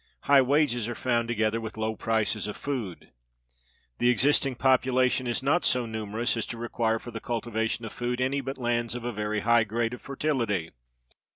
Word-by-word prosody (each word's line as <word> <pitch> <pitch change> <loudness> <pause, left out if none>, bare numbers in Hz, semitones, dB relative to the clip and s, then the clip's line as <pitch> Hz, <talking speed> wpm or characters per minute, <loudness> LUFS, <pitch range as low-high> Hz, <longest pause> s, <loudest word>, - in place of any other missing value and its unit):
High 140 -1 +6
wages 130 -4 +2
are 120 - -4
found 120 -2 0
together 115 -1 0
with 110 -1 -7
low 110 0 -1
prices 110 -1 0
of 105 - -5
food. 120 -11 -5 0.9
The 120 - +4
existing 135 +1 +3
population 130 0 +2
is 120 +2 -1
not 150 +6 +2
so 125 -1 +2
numerous 110 +2 -2
as 115 - -3
to 115 - -6
require 115 -1 0
for 120 - -9
the 115 - -5
cultivation 115 -1 -2
of 110 - -7
food 120 0 -2
any 135 +2 0
but 135 +1 -5
lands 120 -2 -1
of 120 - -5
a 120 - -1
very 105 0 -2
high 115 +1 +4
grade 115 +2 -1
of 125 - -8
fertility. 120 - -1
120 Hz, 185 wpm, -27 LUFS, 110-130 Hz, 0.9 s, High